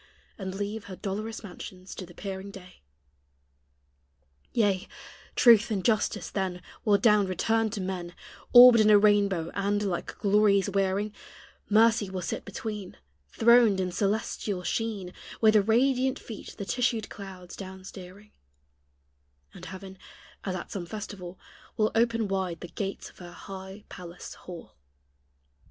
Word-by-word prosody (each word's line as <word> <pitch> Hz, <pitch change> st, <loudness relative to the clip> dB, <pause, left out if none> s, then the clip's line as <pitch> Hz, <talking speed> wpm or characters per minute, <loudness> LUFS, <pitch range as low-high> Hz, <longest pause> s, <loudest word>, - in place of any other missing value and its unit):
And 190 Hz, -2 st, -6 dB
leave 205 Hz, +1 st, -4 dB
her 190 Hz, -, -8 dB
dolorous 215 Hz, +4 st, -5 dB
mansions 185 Hz, -1 st, -9 dB
to 185 Hz, -, -8 dB
the 175 Hz, -, -15 dB
peering 195 Hz, 0 st, -6 dB
day. 185 Hz, -2 st, -13 dB, 1.7 s
Yea, 200 Hz, -5 st, +1 dB, 0.5 s
truth 230 Hz, -2 st, +6 dB
and 195 Hz, -4 st, -2 dB
justice 215 Hz, -3 st, 0 dB
then 185 Hz, -2 st, -3 dB, 0.2 s
Will 205 Hz, -2 st, +4 dB
down 210 Hz, -1 st, +4 dB
return 225 Hz, +4 st, +1 dB
to 210 Hz, 0 st, -5 dB
men, 180 Hz, -2 st, -5 dB, 0.4 s
Orbed 245 Hz, -1 st, +10 dB
in 215 Hz, 0 st, +5 dB
a 210 Hz, -, +8 dB
rainbow; 200 Hz, -5 st, +3 dB
and, 205 Hz, +1 st, 0 dB
like 185 Hz, -4 st, -3 dB
glories 205 Hz, -1 st, +3 dB
wearing, 195 Hz, +2 st, 0 dB, 0.6 s
Mercy 220 Hz, -1 st, +4 dB
will 185 Hz, -1 st, -4 dB
sit -, -, -4 dB
between, 210 Hz, -4 st, -6 dB, 0.3 s
Throned 230 Hz, -, +5 dB
in 185 Hz, -1 st, -1 dB
celestial 200 Hz, -1 st, -1 dB
sheen, 205 Hz, -4 st, -3 dB, 0.3 s
With 220 Hz, -1 st, +5 dB
radiant 260 Hz, +2 st, +3 dB
feet 220 Hz, -, -9 dB
the 200 Hz, -, -5 dB
tissued 235 Hz, -1 st, 0 dB
clouds 185 Hz, -3 st, -9 dB
down 190 Hz, -1 st, -9 dB
steering; 195 Hz, +2 st, -11 dB, 1.2 s
And -, -, -11 dB
heaven, 190 Hz, 0 st, -9 dB, 0.4 s
as 190 Hz, -2 st, -3 dB
at 175 Hz, -, -7 dB
some 180 Hz, -4 st, -5 dB
festival, 190 Hz, -3 st, -7 dB, 0.4 s
Will 215 Hz, 0 st, +2 dB
open 230 Hz, -1 st, +2 dB
wide 190 Hz, -3 st, -2 dB
the 175 Hz, -, -7 dB
gates 195 Hz, -1 st, -5 dB
of -, -, -22 dB
her 175 Hz, -1 st, -10 dB
high 190 Hz, +2 st, -9 dB
palace 175 Hz, -1 st, -9 dB
hall. 175 Hz, -, -11 dB
200 Hz, 140 wpm, -28 LUFS, 185-215 Hz, 1.7 s, Orbed